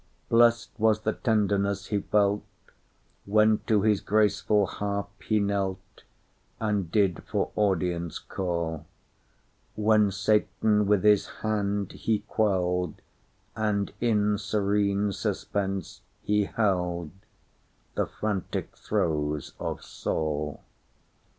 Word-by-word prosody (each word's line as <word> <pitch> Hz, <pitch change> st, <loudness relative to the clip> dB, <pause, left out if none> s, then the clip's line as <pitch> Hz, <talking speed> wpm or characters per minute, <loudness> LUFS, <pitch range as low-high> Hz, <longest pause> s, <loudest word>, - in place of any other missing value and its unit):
Blest 115 Hz, 0 st, +4 dB
was 110 Hz, 0 st, +3 dB
the 110 Hz, 0 st, 0 dB
tenderness 100 Hz, -3 st, +1 dB
he 105 Hz, -, +1 dB
felt, 100 Hz, 0 st, +1 dB, 0.8 s
When 110 Hz, +1 st, +4 dB
to 105 Hz, -3 st, +3 dB
his 105 Hz, -2 st, +3 dB
graceful 105 Hz, 0 st, +2 dB
harp 100 Hz, 0 st, -3 dB
he 110 Hz, -1 st, +1 dB
knelt, 100 Hz, -2 st, -2 dB, 0.6 s
And 105 Hz, -6 st, -1 dB
did 95 Hz, -4 st, +2 dB
for -, -, -1 dB
audience 90 Hz, -4 st, 0 dB
call; 85 Hz, -4 st, -3 dB, 0.9 s
When 105 Hz, -1 st, +4 dB
Satan 105 Hz, +1 st, +2 dB
with 100 Hz, -2 st, +3 dB
his 105 Hz, -1 st, +4 dB, 0.2 s
hand 100 Hz, -2 st, 0 dB
he 110 Hz, -2 st, -1 dB
quelled, 90 Hz, -5 st, 0 dB, 0.6 s
And 105 Hz, -2 st, -1 dB
in 105 Hz, -3 st, +2 dB
serene 100 Hz, -1 st, +1 dB
suspense 95 Hz, -1 st, -3 dB, 0.2 s
he 105 Hz, -1 st, +1 dB
heldThe 90 Hz, -6 st, 0 dB, 1.1 s
frantic 105 Hz, -3 st, -3 dB
throes 75 Hz, -2 st, -1 dB
of -, -, -4 dB
Saul. 75 Hz, -1 st, -3 dB
100 Hz, 100 wpm, -27 LUFS, 95-105 Hz, 1.1 s, Blest